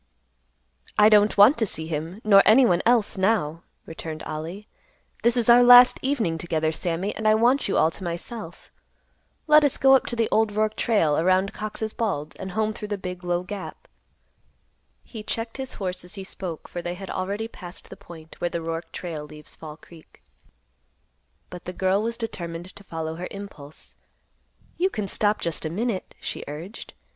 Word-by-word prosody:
"I 210 +1 +7
don't 210 -1 +4
want 215 +7 +7
to 225 - +2
see 160 -3 -4
him, 165 +5 -5
nor 200 -2 +7
any 245 +4 +6
one 175 -6 +3
else, 230 -5 +2
now," 185 -6 +1 0.2
returned 160 -1 -7
Ollie. 165 +7 -6 0.5
"This 235 +1 +2
is 235 - +1
our 240 +1 +8
last 245 0 +8
evening 230 - -1
together, 160 -2 -1
Sammy, 175 +4 -3
and 220 - -1
I 215 - +6
want 245 +5 +3
you - - 0
all 160 - +4
to 190 - -9
myself. 175 +2 -7 0.7
Let 305 0 +6
us 285 - +2
go 270 0 +6
up 265 - +1
the 230 -2 0
old 220 -1 +2
Roark 215 +1 0
trail, 165 -13 +2
around 185 +3 +2
Cox's 215 0 -5
Bald, 155 -10 -3
and 190 -1 -6
home 215 +1 0
through 210 - -7
the 205 -1 -3
big, 180 -1 -7
low 175 0 -1
gap." 195 +1 -8 1.2
He 225 - -9
checked 225 +3 -4
his 265 -1 -3
horse 185 -2 -4
as 180 +3 -6
he 195 - -6
spoke, 185 -4 -7
for 175 - -6
they 175 +1 -4
had 195 +1 -8
already 200 +4 -3
passed 180 -5 -10
the - - -7
point 160 -2 -14
where 175 - 0
the - - -3
Roark 165 +1 -5
trail 160 -4 -6
leaves 150 0 -12
Fall 155 -1 -10
Creek. 165 -1 -18 1.3
But 180 -1 -9
the 180 - -5
girl 190 +2 +1
was 230 +1 -3
determined 180 -6 -6
to 205 - -12
follow 160 -3 -5
her 180 - -5
impulse. 195 -8 -11 0.8
"You 370 +3 +2
can 210 - -4
stop 205 +2 0
just 170 -2 -2
a 155 - -2
minute," 205 +3 -3
she - - -5
urged. 160 +9 -8
190 Hz, 185 wpm, -24 LUFS, 170-220 Hz, 1.3 s, our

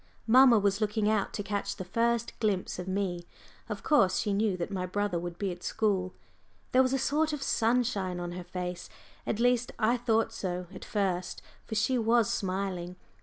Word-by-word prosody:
Mamma 250 0 +7
was 200 0 +1
looking 210 0 +1
out 215 -2 +1
to 205 - -3
catch 200 0 -3
the 185 - -6
first 235 +4 0
glimpse 200 -5 -1
of 180 - -5
me 185 -3 -2 0.4
of - - -5
course 200 -12 +4
she 205 - 0
knew 200 -2 +1
that 175 +2 -4
my 185 -2 -2
brother 205 -1 -1
would 175 0 -6
be 195 -1 -2
at 175 0 -8
school. 190 -4 0 0.6
There 255 - +5
was 255 -1 +2
a 270 - +2
sort 300 +4 +1
of 290 -2 -3
sunshine 225 -8 +1
on 175 0 -4
her 180 +1 -6
face, 180 0 -5 0.4
at 215 - -1
least 245 0 +2
I 235 +2 +2
thought 225 -2 +1
so 180 -3 -3
at - - -9
first, 185 -4 -2 0.2
for 220 - -4
she 220 +4 +2
was 230 -1 +3
smiling. 185 -2 -3
205 Hz, 190 wpm, -29 LUFS, 185-230 Hz, 0.6 s, Mamma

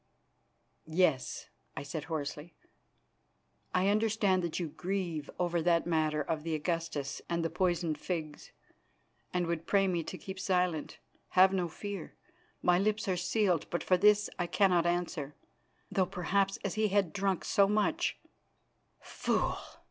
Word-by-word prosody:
"Yes," 160 -5 +1 0.3
I 140 - -3
said 150 +1 -5
hoarsely. 155 0 -5 1.2
"I 185 +1 +2
understand 210 -3 +2
that 170 -1 -2
you 170 -3 -2
grieve 175 -3 -3
over 175 -1 0
that 170 0 +3
matter 155 -3 +1
of 155 +1 -2
the 160 0 -2
Augustus 155 -3 -2
and 170 -1 0
the 165 - -1
poisoned 175 -3 0
figs, 155 -4 -5 0.8
and 180 -1 0
would 165 -1 -3
pray 195 -1 +3
me 175 -2 0
to 185 - -6
keep 190 0 -8
silence. 180 -5 0 0.4
Have 190 +1 +7
no 180 -2 +1
fear, 200 +1 -7 0.5
my 180 0 +4
lips 210 +1 0
are 185 - +1
sealed, 180 -1 +1
but 175 - -2
for 185 - +4
his 210 +2 +5
I 175 - 0
cannot 180 -3 +3
answer, 175 -4 -2 0.6
though 185 -2 +2
perhaps 195 +3 0
as 195 - -1
he 215 0 +2
had 195 -4 +1
drunk 195 -2 0
so 200 -2 +4
much 210 +1 +1 0.4
" - - -44
"Fool!" - - -1
180 Hz, 150 wpm, -31 LUFS, 165-195 Hz, 1.2 s, Have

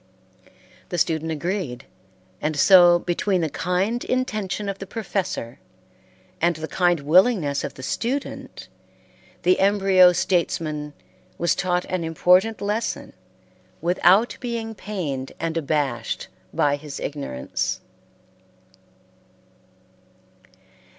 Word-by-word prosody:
The 175 - -3
student 160 -1 0
agreed, 165 -4 -3 0.6
and 150 0 -1
so 175 +1 +7
between 180 +2 0
the 160 -3 -1
kind 190 +7 -1
intention 215 -5 -2
of 195 -1 -4
the 195 - -7
professor 190 - -4 0.8
and 170 +1 +3
the 160 +1 -5
kind 175 -3 +1
willingness 160 - +3
of - - -5
the 130 - -10
student 260 - -4 0.8
the 180 +1 +3
embryo 195 -2 +5
statesman 155 -5 -1 0.4
was 170 - +2
taught 180 -1 0
an 185 -2 -2
important 180 +6 +3
lesson 210 +3 -2 0.7
without 185 +6 +3
being 230 -2 -4
pained 165 -12 -5
and 165 0 -2
abashed 140 -7 -2 0.2
by 145 -1 +1
his 145 -1 -8
ignorance. 140 - -3
180 Hz, 100 wpm, -23 LUFS, 155-195 Hz, 0.8 s, so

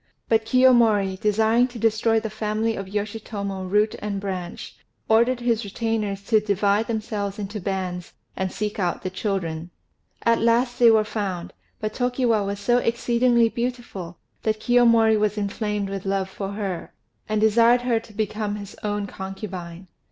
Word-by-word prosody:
But 225 -1 +2
Kiyomori, 230 -6 +4
desiring 220 +4 +3
to 245 -1 -10
destroy 225 0 +2
the 220 -1 -5
family 215 +1 -1
of 195 - -5
Yoshitomo 200 -2 -4
root 210 +2 +2
and 205 -1 -3
branch, 185 -3 -5 0.3
ordered 235 +3 +3
his 235 -1 +1
retainers 210 -1 -2
to 215 +2 +3
divide 205 +1 +1
themselves 210 -3 -3
into 205 0 -5
bands, 180 -2 -3 0.2
and 190 -1 -2
seek 210 0 -3
out 180 -3 -1
the 185 - -3
children. 180 -4 -3 0.5
At 230 0 +3
last 240 +2 +2
they 240 -1 +8
were 220 -1 +5
found; 200 -5 -4 0.3
but 215 0 -3
Tokiwa 245 -3 +1
was 200 0 -3
so 240 +4 +3
exceedingly 235 0 +2
beautiful 235 -8 -5 0.2
that 215 -1 0
Kiyomori 230 -2 +4
was 210 0 0
inflamed 210 0 -2
with 195 -1 -4
love 195 -1 -1
for 195 0 -5
her, 195 -4 -4 0.3
and 215 0 +1
desired 230 +3 +5
her 240 -2 +1
to 225 - -15
become 210 0 -2
his 205 -1 -8
own 205 -1 -2
concubine. 190 -3 -7
210 Hz, 155 wpm, -24 LUFS, 195-230 Hz, 0.5 s, they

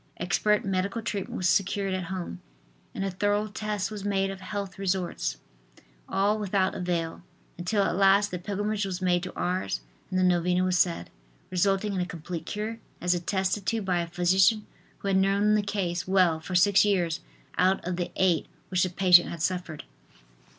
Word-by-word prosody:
Expert 210 +4 +1
medical 195 +3 -1
treatment 205 -4 -3
was 185 - +1
secured 195 +1 +1
at 185 -1 -2
home 175 - -5 0.5
and 195 - -2
a 195 - -2
thorough 205 +3 +1
test 210 -1 -3
was 210 -2 -6
made 195 -1 0
of 190 -1 -9
health 200 -1 -5
resorts, 180 - -1 0.7
all 205 +2 +1
without 195 -2 +1
avail, 170 -2 -2 0.3
until 200 +4 0
at 175 - 0
last 200 +1 +4
the 180 - -3
pilgrimage 205 +3 -2
was 190 -2 -3
made 180 -1 +2
to 185 - -5
Ars 175 - -1 0.3
and 185 - -1
the 185 - +3
novena 180 0 +2
was 185 -1 +1
said, 170 - +1 0.4
resulting 195 +3 +1
in 185 - -1
a - - 0
complete 170 0 -6
cure 220 +2 -4 0.2
as 180 0 +2
attested 190 +2 -1
to 230 - +1
by 180 -2 +1
a 170 - -4
physician 185 +5 +3 0.3
who - - -6
had 195 -1 +3
known 200 +2 +3
the 215 - +3
case 190 -4 -2
well 185 -4 +3
for 170 +3 -6
six 195 +2 +5
years 180 -5 +1 0.4
out 190 +1 +3
of 180 0 -1
the 175 0 -2
eight 180 -4 +2 0.2
which 185 -1 +1
the 185 - +2
patient 180 -1 +5
had 170 - -6
suffered. 180 -4 -2
190 Hz, 180 wpm, -27 LUFS, 180-200 Hz, 0.7 s, six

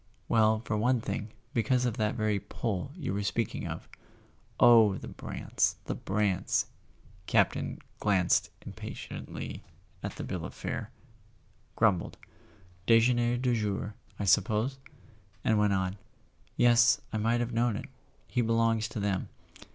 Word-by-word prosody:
"Well, 110 -1 +3
for 105 - -1
one 125 +3 +2
thing, 110 -1 -4 0.2
because 125 +2 +2
of 120 -3 -1
that 105 0 0
very 110 -3 +1
'pull' 110 +4 -3
you 165 - -3
were 100 - -1
speaking 110 +2 -2
of." - - -6 0.7
"Oh, 115 -4 +7
the - - -8
Brants, - - -1
the - - -2
Brants!" 100 -2 0 0.6
Campton - - +2 0.2
glanced 95 -4 +2 0.2
impatiently - - -7 0.4
at - - -5
the - - -5
bill 90 -3 -4
of - - -7
fare, - - -4 0.9
grumbled: 100 -6 +2 0.7
"Dejeuner 120 +1 +4
du 125 0 +1
jour, 105 -1 -2 0.2
I 100 - -2
suppose?" 110 +7 +2 0.6
and 110 -1 +3
went 105 -1 +3
on: 95 +1 -1 0.6
"Yes; 120 -3 +5
I - - 0
might 115 +2 +2
have 120 0 -2
known 115 -1 +2
it—he 130 +1 -6
belongs 115 -1 +2
to 110 -1 -6
them. 100 -2 -1
110 Hz, 135 wpm, -30 LUFS, 105-120 Hz, 0.9 s, Oh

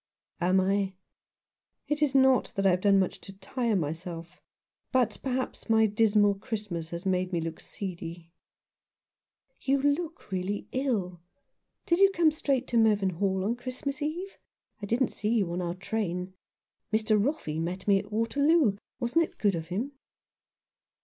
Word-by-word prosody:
" - - -36
Am 185 +2 +4
I? 195 0 +1 0.9
It 295 0 -1
is 285 -3 +2
not 265 -1 +4
that 195 - 0
I 190 - +6
have 180 0 +1
done 200 -1 +5
much 190 -1 0
to 195 - -9
tire 230 +3 -1
myself; 165 +1 -4 0.5
but 255 -4 +1
perhaps 260 -2 -3
my 220 0 +5
dismal 210 -1 +3
Christmas 195 -5 -5
has 170 +2 -6
made 185 -1 0
me 175 - 0
look 165 0 -4
seedy." 170 -3 -7 0.7
" - - -50
You 275 +1 +2
look 300 - -1
really 190 +2 -2
ill. 205 -10 -1 0.6
Did 340 +1 +2
you 395 0 +7
come 325 -2 +5
straight 275 -4 0
to 235 - +1
Mervynhall 195 -3 +2
on 230 +3 +1
Christmas 255 +4 -5
Eve? 345 +6 -4 0.4
I 205 - -4
didn't 240 +4 +2
see 215 +3 -1
you 190 -6 +1
in 180 - -2
our 175 0 -2
train. 185 -2 -3 0.6
Mr. 215 -1 +3
Roffey 230 - -2
met 185 +3 -4
me 200 -1 +5
at 205 +2 -9
Waterloo. 255 +2 +3 0.2
Wasn't 255 +7 +2
it - - -7
good 205 -2 +2
of 165 -2 -4
him 215 +11 -3
205 Hz, 160 wpm, -28 LUFS, 185-260 Hz, 0.9 s, you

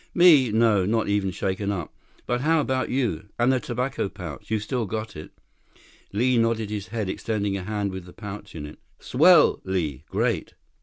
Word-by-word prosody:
"Me? 155 -9 +6
No. 110 -3 +3
Not 110 +4 0
even 100 -1 +1
shaken 95 +2 -2
up. 90 -5 -4 0.3
But 120 0 -1
how 160 +3 +3
about 130 -3 0
you? 115 - -1
And 120 +2 +3
the 130 - +2
tobacco 125 -3 -2
pouch. 90 -8 -9
You've 110 -1 0
still 120 -1 -2
got 110 +2 -4
it?" 75 - -8 0.8
Li 120 +4 +2
nodded 115 -2 0
his 105 -1 -4
head, 110 -3 -3
extending 100 0 -2
a 100 - -3
hand 100 +1 -2
with 95 -1 -7
the 90 - -12
pouch 105 -3 -8
in 75 -2 -5
it. 75 - -11 0.2
"Swell, 160 +5 +5
Li. 80 -8 -2
Great. - - -1
105 Hz, 185 wpm, -25 LUFS, 95-120 Hz, 0.8 s, Me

